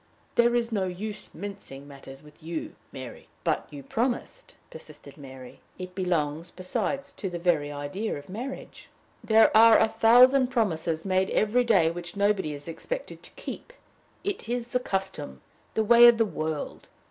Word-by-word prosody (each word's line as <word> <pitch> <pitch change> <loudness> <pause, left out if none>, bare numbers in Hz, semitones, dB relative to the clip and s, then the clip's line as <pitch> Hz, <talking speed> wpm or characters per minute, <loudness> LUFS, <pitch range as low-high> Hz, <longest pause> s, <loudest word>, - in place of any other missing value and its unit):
There 235 0 +3
is 235 -1 0
no 195 -4 0
use 205 +4 -6
mincing 160 -7 -9
matters 135 0 -12
with 150 0 -18
you, 160 0 -5 0.2
Mary." 130 -3 -9 0.2
"But - - -1
you 145 -2 -10
promised," 250 - -3 0.2
persisted - - -12
Mary. 130 -3 -12 0.2
"It 185 0 -8
belongs, 170 -3 -1
besides, 275 +11 -3
to 200 -8 -5
the 175 - -5
very 165 -4 0
idea 145 +10 -4
of 145 - -11
marriage." 245 +8 -8 0.3
"There 220 0 +4
are 225 0 +8
a - - +4
thousand 250 +4 +5
promises 170 -10 -1
made 190 0 +1
every 220 +4 +2
day 195 -9 +3
which 175 +1 -8
nobody 200 -5 +1
is 145 +1 -7
expected - - -6
to - - -13
keep. - - -8 0.5
It 390 - -4
is 240 0 -2
the 250 - 0
custom, 190 - -4 0.3
the 220 - +2
way 235 +2 +8
of 235 -1 +6
the 225 - +3
world! 155 -6 -5
190 Hz, 160 wpm, -27 LUFS, 155-230 Hz, 0.5 s, are